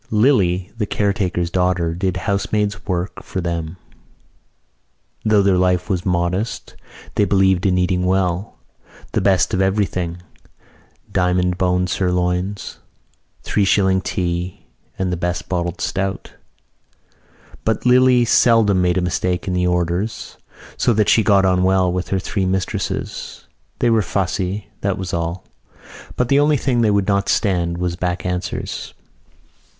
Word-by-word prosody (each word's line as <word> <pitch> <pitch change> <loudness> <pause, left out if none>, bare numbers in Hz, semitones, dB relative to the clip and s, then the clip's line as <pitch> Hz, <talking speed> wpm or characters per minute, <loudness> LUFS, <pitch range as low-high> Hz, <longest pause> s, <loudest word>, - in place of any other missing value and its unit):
Lily, 100 -6 +2
the 105 - 0
caretaker's 95 -4 -1
daughter, 90 -2 +1
did 95 +1 -1
housemaid's 100 +1 -1
work 90 -1 -3
for - - -5
them. 85 -1 -3 1.5
Though 105 -2 +3
their 95 -2 +3
life 90 +1 +1
was 90 0 -1
modest 90 +4 -2 0.4
they - - +2
believed 95 -2 +3
in 90 -1 +2
eating 90 0 +1
well; 95 +1 0 0.6
the - - 0
best 95 -2 +2
of 95 - +1
everything: 90 -3 -1 0.9
diamond 90 0 +1
bone 90 0 +2
sirloins, 90 +2 -1 0.6
three 105 - +1
shilling 95 -1 +3
tea 90 -2 -3 0.3
and 95 -1 -1
the - - -2
best 90 +1 -3
bottled 85 -2 -2
stout. 95 0 -3 1.3
But 110 +1 -1
Lily 125 -1 +5
seldom 110 -5 +4
made 90 0 +2
a - - +2
mistake 90 0 -1
in 95 - -1
the 90 0 +1
orders 90 +4 -2 0.4
so 120 - +2
that 105 -1 +2
she 115 - +5
got 100 -2 +4
on 90 -1 +2
well 95 -1 +2
with 90 0 -2
her 95 - 0
three 95 0 -2
mistresses. 95 0 -3 0.3
They 120 - +2
were 110 -1 +4
fussy, 95 +1 -2
that 100 -1 -1
was 95 -2 -5
all. 85 +1 -3 0.7
But 125 -1 0
the 140 - +4
only 150 0 +3
thing 125 -2 0
they 110 - +3
would 100 -1 +1
not 100 -1 +1
stand 85 -4 +1
was 90 -1 -2
back 90 0 -3
answers. 90 0 -4
95 Hz, 140 wpm, -20 LUFS, 90-100 Hz, 1.5 s, Lily